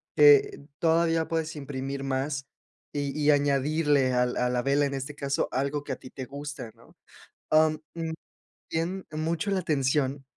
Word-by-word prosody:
que 425 - +6 0.2
todavía 165 -1 +2
puedes 160 -1 -2
imprimir 135 -1 -5
más 135 +1 -2 0.5
y 145 0 -2
y 150 0 +5
añadirle 145 -1 +2
al 125 0 +1
a 125 0 +1
la 125 0 0
vela, 140 +1 +3
en 140 - -2
este 135 +2 -5
caso, 140 -1 -1
algo 140 +3 -1
que 140 - -3
a - - -3
ti 130 - -12
te 130 - -7
gusta, 140 -3 -7
¿no? - - -21 0.6
Am, 155 0 +4 0.2
mm, 165 -1 -3 0.6
bien 175 +4 -2
mucho 160 +5 -1
la 190 - +1
atención 135 -3 0
145 Hz, 160 wpm, -27 LUFS, 135-160 Hz, 0.6 s, que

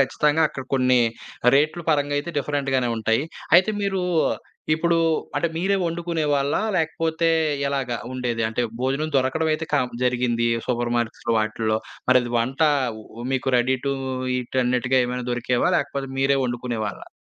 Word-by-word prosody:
ఖచ్చితంగా 150 +4 +2
అక్కడ 135 - -7
కొన్ని 130 -1 +4 0.5
రేట్లు 155 +4 +2
పరంగా 145 -1 +1
అయితే 170 +4 -4
డిఫరెంట్‌గానే 135 -3 0
ఉంటాయి. 110 +4 +1 0.3
అయితే 185 +4 +4
మీరు, 195 -1 0 0.7
ఇప్పుడు 170 +1 +1 0.4
అంటే 170 - +1
మీరే 195 +3 +1
ఒండుకునే 170 -1 -2
వాళ్ళా? 140 0 +1 0.2
లేకపోతే 165 0 0 0.4
ఎలాగా 130 -4 -1 0.2
ఉండేది 120 -3 -2
అంటే 115 +2 -1 0.2
భోజనం 140 +4 -1
దొరకడం 135 +5 +1
అయితే 155 +1 -2
కా 145 - +4 0.2
జరిగింది 120 -1 +1 0.2
సూపర్ 120 -1 -1
మార్కెట్స్‌లో 115 0 -2
వాటిల్లో. 110 0 0 0.3
మరది 120 -2 +3
వంట 130 +7 -1 0.7
మీకు 130 0 0
రెడీ 130 +2 +2
టూ 140 - +1 0.4
ఈట్ 125 +1 -3
అన్నట్టుగా 125 +1 +2
ఏమైనా 125 0 -3
దొరికేవా? 125 +6 +1
లేకపోతే 140 -1 -2
మీరే 135 +1 +3
ఒండుకునేవారా? 120 -4 -4
130 Hz, 135 wpm, -23 LUFS, 120-155 Hz, 0.7 s, కొన్ని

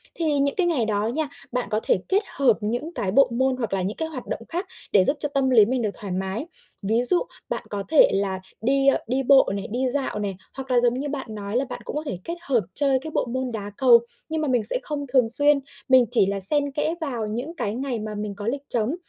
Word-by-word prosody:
thì 305 -4 0
những 280 0 +1
cái 365 -3 +1
ngày 280 -10 +1
đó 210 0 0
nha, 300 +6 -1 0.2
bạn 250 0 -2
có 215 - +1
thể - - +2
kết 395 +3 +2
hợp 255 -6 +3
những 245 +11 -3
cái 190 - -2
bộ 270 +5 +5
môn 260 +2 +1
hoặc 230 -6 -3
là 190 - 0
những 195 +4 -3
cái 320 - -2
hoạt 275 -6 -8
động - - -4
khác 355 +3 -3 0.2
để 195 -3 +5
giúp 295 - +1
cho 295 - +2
tâm 275 -2 +1
lý 220 -5 +6
mình 250 +1 -1
được 215 - 0
thoải 200 -3 -7
mái. 190 +7 -3 0.4
Ví 225 +4 +1
dụ 350 +8 +3 0.3
bạn - - -3
có 200 -1 -4
thể 315 - +6
là 195 -1 -1 0.2
đi, 270 +4 +2
ơ, 275 - +5
đi 260 +3 0
bộ 270 +1 +5
này, 200 - -4
đi 255 +2 0
dạo 265 -5 -1
này, 200 -2 -3 0.2
hoặc 265 -1 -7
là, 245 - +4
giống 245 +1 +1
như 290 - -3
bạn 275 -2 -4
nói 205 +1 -5
là 270 - 0
bạn 245 -1 -7
cũng - - -6
có 300 - -2
thể 190 - -4
kết 340 - -4
hợp 265 -8 +1
chơi 275 -2 +2
cái 315 +4 -7
bộ - - 0
môn 255 +1 -3
đá 205 -2 -5
cầu, 245 -3 +7 0.3
nhưng 315 0 -2
mà 305 - -1
mình 250 -4 +1
sẽ 365 - +7
không 290 -2 -4
thường 250 -4 +4
xuyên, 290 +4 +3 0.3
mình 260 -2 +6
chỉ 240 -5 +4
là 195 +1 -2
xen 285 +9 +4
kẽ 305 +3 -1
vào 240 -8 -3
những 250 +10 -5
cái 210 -8 -3
ngày 255 -2 -3
mà 215 0 -5
mình 210 -1 -4
có 205 +1 -6
lịch 275 +4 -1
trống. 235 +5 0
250 Hz, 265 wpm, -24 LUFS, 215-280 Hz, 0.4 s, cầu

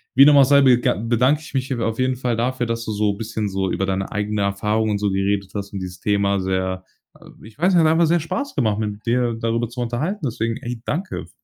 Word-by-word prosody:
wie 135 - +8
dem 145 0 +7
auch 140 - +8
sei, 140 +1 +5
bega 125 -2 +4
bedanke 120 +8 +1
ich 160 - -12
mich 135 0 -2
auf 115 0 -2
jeden 130 0 +1
Fall 125 -2 -1
dafür, 125 +2 -1
dass 115 0 -3
du 110 - -3
so 105 -1 0
bisschen 110 0 -4
so 95 0 -1
über 95 +2 -1
deine 95 0 -2
eigene 105 0 -2
Erfahrung 105 +2 0
und 105 - 0
so 100 -1 -1
geredet 100 0 -1
hast 100 -1 -5
und 100 - -4
dieses 90 -1 -7
Thema 100 -1 +1
sehr 95 0 -2 0.6
ich 110 +5 -15
weiß 180 +3 +3
nicht, 170 - +5
hat 155 - +4
einfach 165 +1 +3
sehr 170 +2 +3
Spaß 280 - -4
gemacht, 110 -8 +1
mit 105 -1 -4
dir 120 0 +1
darüber 115 0 -1
zu 125 +1 -6
unterhalten. 135 - -2
Deswegen, 115 -2 -2
ey, 120 -1 -6
danke 180 +9 -3
f - - -41
115 Hz, 240 wpm, -21 LUFS, 100-130 Hz, 0.6 s, wie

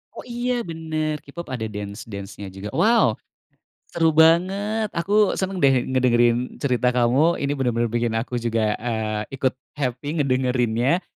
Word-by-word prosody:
Oh, - - -7
iya, 240 +1 -1
bener, 160 -4 -3
K-pop 170 +5 -9
ada 120 -4 -3
dance-dance-nya 100 -1 -7
juga. 95 +2 -7
Wow, 170 - +3 0.7
seru 165 -2 +2
banget. 195 +7 +3
Aku 205 +4 +2
seneng 190 0 -2
deh 135 -5 +4
ngedengerin 120 -1 +2
cerita 125 -2 +1
kamu, 130 +7 +3
ini 140 - 0
bener-bener 120 -3 0
bikin 120 -1 -1
aku 120 +2 -2
juga, 115 -2 0
eee, 110 -2 -2
ikut 130 -1 +1 0.2
happy 145 +3 -2
ngedengerinnya. 130 +3 +1
130 Hz, 135 wpm, -23 LUFS, 115-165 Hz, 0.7 s, deh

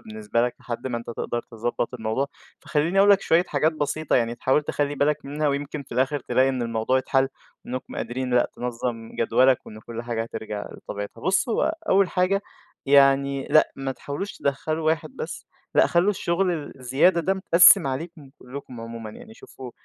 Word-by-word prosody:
بالنسبة 110 +2 -2
لك 125 0 0
لحد 120 +1 -5
ما 120 -2 -2
أنت 120 - -11
تقدر 120 0 -3
تضبَّط 120 +1 -3
الموضوع، 110 +3 -1 0.3
فخلّيني 165 +5 0
أقول 200 +1 +6
لك 200 - +6
شوية 170 +2 +3
حاجات 160 +2 +1
بسيطة 155 0 -1
يعني 115 -1 0
تحاول 130 +4 +1
تخلّي 145 0 -1
بالك 150 +1 0
منها 150 +2 -1
ويمكن 140 +1 -3
في - - -13
الآخر 130 +4 +1
تلاقي 130 +2 +2
إن 130 -2 -1
الموضوع 115 +2 0
يتحل، 135 0 +1 0.4
إنكم 130 +1 -6
قادرين 125 0 -3
لأ 120 - +3
تنظّم 120 -2 -4
جدوَلك، 125 +3 +3
وإن 110 0 -10
كلّ 115 +1 -7
حاجة 120 -1 -2
هترجع 110 -2 -6
لطبيعتها، 100 0 -7
بُصّ 190 +6 +1
هو 305 +7 +1
أول 195 -1 +4
حاجة 195 +2 +1 0.4
يعني 140 0 +4
لأ 155 - +5
ما 135 -1 -3
تحاولوش 145 +9 -5
تدخّلوا 155 +3 -2
واحد 160 -1 0
بس، - - -6 0.3
لأ - - +6
خلّوا 175 +4 +3
الشغل 170 -5 -1
الزيادة 135 +8 +3
ده 190 +4 +1
متقسّم 185 -1 +6
عليكم 145 +1 -5
كلّكم 125 -2 -9
عمومًا 115 -1 -7
يعني، 220 - -13
شوفوا 130 - -11
135 Hz, 175 wpm, -24 LUFS, 120-155 Hz, 0.4 s, أقول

